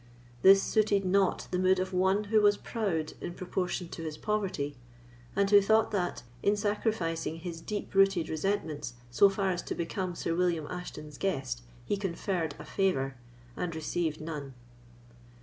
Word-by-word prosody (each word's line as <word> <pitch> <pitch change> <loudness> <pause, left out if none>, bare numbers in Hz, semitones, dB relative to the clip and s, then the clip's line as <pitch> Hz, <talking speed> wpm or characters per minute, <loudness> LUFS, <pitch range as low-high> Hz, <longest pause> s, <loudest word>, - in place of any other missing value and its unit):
This 195 +1 +8
suited 205 -2 +2
not 190 +1 +2
the 180 - 0
mood 185 0 +4
of 185 +1 -2
one 190 +3 +3
who 215 +1 +3
was 205 0 +5
proud 180 -9 -2
in 175 - -5
proportion 180 -1 -2
to - - -7
his 155 -2 -5
poverty, 185 -10 -1 0.6
and 200 0 +3
who 205 0 +7
thought 220 +2 +3
that, 180 - -1 0.2
in 205 +1 +2
sacrificing 205 -6 -1
his 165 -1 -6
deep 210 +4 -4
rooted 195 -3 +4
resentments 155 -6 -2 0.2
so 195 +11 +6
far 195 -1 0
as 175 - -2
to - - -4
become 180 +1 -3
Sir 165 - -2
William 170 -3 +1
Ashton's 150 -5 -7
guest, 135 -10 -1 0.2
he 205 - 0
conferred 175 -4 -2
a - - -9
favour, 135 -9 0 0.4
and 170 -2 -3
received 160 0 -1
none. 150 -4 -6
180 Hz, 160 wpm, -30 LUFS, 160-200 Hz, 0.6 s, This